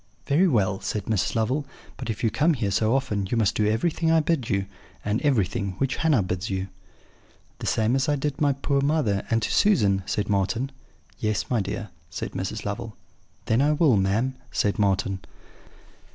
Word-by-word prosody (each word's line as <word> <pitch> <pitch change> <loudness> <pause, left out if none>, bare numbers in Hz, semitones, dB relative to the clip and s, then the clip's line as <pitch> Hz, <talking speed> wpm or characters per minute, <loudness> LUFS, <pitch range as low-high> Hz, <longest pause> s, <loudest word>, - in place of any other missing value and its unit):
"'Very 165 +7 +4
well,' 100 - +1
said 105 -2 -3
Mrs. 105 -6 0
Lovel; 125 +6 +1 0.3
'but 125 -3 -6
if 110 - -3
you 115 - +2
come 160 +2 +2
here 105 -6 -1
so 110 +5 +2
often 105 -8 -1
you 120 - 0
must 110 -3 +2
do 105 - +1
everything 160 +9 +1
I 165 - +5
bid 155 -6 0
you, 100 -1 +1 0.4
and 105 +2 0
everything 105 - +1
which 135 +3 0
Hannah 150 -10 +3
bids 90 +2 -3
you.' 95 0 -2 0.9
"'The - - -4
same 110 +3 +2
as 135 +2 +1
I 145 - +3
did 145 0 -2
to - - -11
my 145 -2 +4
poor 140 +1 0
mother, 140 -9 +1
and 115 -1 +1
to - - -1
Susan?' 105 - +3
said 100 +1 -1
Marten. 105 +6 0 0.5
"'Yes, 110 +2 -1
my 120 -4 +2
dear,' 105 +2 -4 0.2
said - - -5
Mrs. - - -4
Lovel. - - -4 0.5
"'Then 115 +3 +2
I 150 +2 +3
will, 150 -5 +4
ma'am,' 105 +7 +1 0.2
said 105 +1 0
Marten. 100 -1 +1
110 Hz, 190 wpm, -25 LUFS, 100-140 Hz, 0.9 s, I